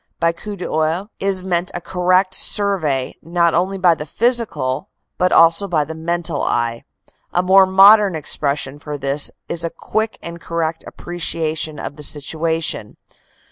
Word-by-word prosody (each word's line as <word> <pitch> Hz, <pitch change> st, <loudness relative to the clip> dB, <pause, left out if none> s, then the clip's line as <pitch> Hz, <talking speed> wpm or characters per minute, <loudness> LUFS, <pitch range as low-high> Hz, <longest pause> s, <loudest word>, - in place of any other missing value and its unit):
By 165 Hz, 0 st, +2 dB
coup 205 Hz, +5 st, -8 dB
d 180 Hz, -, -7 dB
oeil 160 Hz, +7 st, -1 dB
is 195 Hz, -1 st, 0 dB
meant 180 Hz, -1 st, -1 dB
a -, -, -2 dB
correct 185 Hz, +1 st, +1 dB
survey 165 Hz, -14 st, 0 dB
not 170 Hz, 0 st, +1 dB
only 185 Hz, +4 st, 0 dB
by 180 Hz, -2 st, +4 dB
the 150 Hz, -1 st, -7 dB
physical 225 Hz, -, -1 dB, 0.3 s
but 180 Hz, 0 st, +2 dB
also 165 Hz, +4 st, +5 dB
by 165 Hz, -5 st, +1 dB
the 160 Hz, -, -7 dB
mental 165 Hz, -1 st, -3 dB
eye. 115 Hz, -1 st, -1 dB, 0.5 s
A 180 Hz, -, +2 dB
more 190 Hz, +1 st, +6 dB
modern 195 Hz, 0 st, +6 dB
expression 145 Hz, -2 st, -2 dB
for 150 Hz, 0 st, -6 dB
this 140 Hz, +1 st, +1 dB, 0.2 s
is 170 Hz, 0 st, -2 dB
a 170 Hz, -, -1 dB
quick 220 Hz, +6 st, -3 dB
and 170 Hz, 0 st, -8 dB
correct 165 Hz, -1 st, -3 dB
appreciation 160 Hz, -3 st, -2 dB
of 145 Hz, -, -6 dB
the -, -, -9 dB
situation. 160 Hz, -5 st, -2 dB
170 Hz, 155 wpm, -19 LUFS, 155-190 Hz, 0.5 s, more